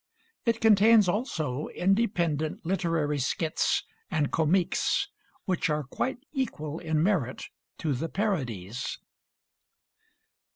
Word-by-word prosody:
It 230 -1 +1
contains 220 -1 +6
also 155 - -1
independent 175 -7 0
literary 165 -5 0
skits 155 +4 0 0.3
and 155 -5 0
comiques 165 +3 +2 0.4
which 185 -3 0
are 150 0 0
quite 245 - -2 0.2
equal 165 - -3
in 160 -2 0
merit 165 - 0 0.3
to 155 -3 -1
the 160 +6 -3
parodies. 125 - -2
165 Hz, 95 wpm, -28 LUFS, 150-200 Hz, 0.4 s, contains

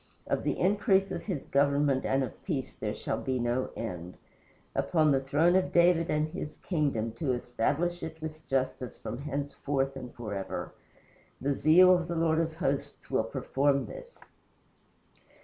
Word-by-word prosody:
Of - - 0
the - - 0
increase 195 -1 +3
of - - -4
his 175 -10 -3
government 140 -1 +2
and 135 0 +2
of 130 - -7
peace 145 -9 -3
there 105 0 -4
shall - - -3
be 130 -1 -1
no 120 +1 0
end, 90 -5 -6 0.6
Upon 155 -3 +2
the 135 - +4
throne 150 +6 +3
of 190 0 +2
David 170 -1 +4
and 150 0 +1
his 155 -3 -6
kingdom, 140 - -1
To 135 -5 +1
establish 140 +8 -1
it 160 0 -6
with 155 0 -7
justice 130 -1 -1
from 120 - -6
henceforth 140 -1 -2
and 125 -2 -7
forever. 105 -5 -5 0.7
The 140 +1 0
zeal 175 +6 +7
of 175 -2 +1
the 170 - -3
Lord 160 -1 +2
of 165 -1 -1
Hosts 140 -5 -3
will - - +2
perform 140 0 +1
this." - - -10
145 Hz, 160 wpm, -30 LUFS, 130-170 Hz, 0.7 s, zeal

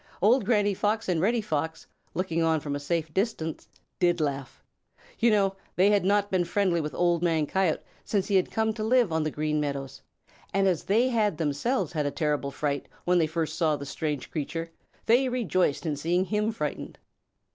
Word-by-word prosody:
Old 225 +4 +4
Granny 205 -2 +2
Fox 215 +3 -1
and 175 -4 +1
Reddy 230 +5 +2
Fox, 160 -5 -3 0.3
looking 170 -2 -1
on 160 -1 +2
from 145 -1 -4
a - - -3
safe 160 +1 -2
distance, 190 -6 -2 0.3
did 175 -1 +3
laugh. 140 -3 -3 0.6
You 235 - +4
know 195 -3 +2 0.2
they 195 +3 +4
had 205 -2 +3
not 205 +1 +2
been 185 -2 +2
friendly 175 -1 +1
with 150 0 -5
Old 175 -1 +2
Man 165 -3 +2
Coyote 185 0 0 0.2
since 200 -3 0
he 195 -3 +4
came 220 +3 -1
to 215 -1 -4
live 235 -3 +3
on 160 0 +1
the 155 - 0
Green 150 0 -1
Meadows, 140 -2 -4 0.5
and 195 0 +3
as 180 -4 0
they 230 +6 +3
had 210 -8 +1
themselves 160 - -1
had 150 -3 0
a - - +1
terrible 150 -2 -1
fright 140 0 -2 0.2
when 180 0 +3
they 160 - +2
first 160 0 -2
saw 160 -3 +2
the 140 - -7
strange 150 -1 -4
creature, 165 +2 -4 0.3
they 255 +3 +4
rejoiced 185 - 0
in 155 -2 0
seeing 175 +6 0
him 210 +2 0
frightened. 150 -9 -4
175 Hz, 190 wpm, -27 LUFS, 155-205 Hz, 0.6 s, Old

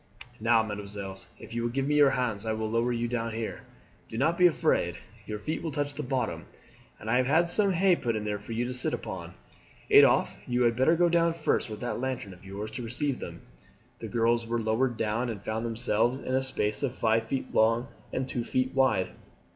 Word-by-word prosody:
"Now, 115 0 +4
mesdemoiselles, 100 -3 -6
if - - -11
you 120 - -1
will 120 - 0
give 135 +3 -1
me 150 - +1
your 145 -1 +6
hands 115 -5 -1
I 110 - +1
will 110 0 -2
lower 115 +2 +1
you 120 0 -1
down 115 -1 -2
here. 115 -1 -4 0.5
Do 110 - -6
not 155 +7 +2
be 180 +1 +6
afraid 150 - +1 0.3
your 105 - -3
feet 155 +10 -4
will 165 - -3
touch 145 -1 -2
the 145 - -5
bottom; 130 -2 -2 0.5
and 105 - -10
I 120 +2 +3
have 130 0 +2
had 160 +5 +4
some 200 +3 +4
hay 185 0 +4
put 120 -7 -2
there 105 -1 -2
for 105 - -11
you 120 +2 -1
to 125 - -4
sit 125 - 0
upon. - - -7 0.6
Adolphe, - - +6
you 125 0 +1
had 115 -1 +3
better 130 +7 +4
go 175 +1 +4
down 170 -1 +3
first 155 -6 0
with 105 -1 -7
that 120 - -3
lantern 125 -6 -3
of 90 - -17
yours 100 +3 -6
to 125 - -5
receive 125 +4 -1
them." - - -8 0.6
The - - -6
girls 115 0 +1
were 120 0 -1
lowered 115 +2 0
down 110 +3 -1
and 110 -3 -4
found 110 +2 -2
themselves 115 +1 +1
in 130 - -5
a 130 - +3
space 105 -5 +1
of 135 -3 -1
five 115 -1 +2
feet 130 +2 -4
long 115 +2 +3 0.2
and 130 0 -2
two 120 -2 -2
feet 130 +2 -1
wide. 130 -8 +2
120 Hz, 220 wpm, -28 LUFS, 110-135 Hz, 0.6 s, your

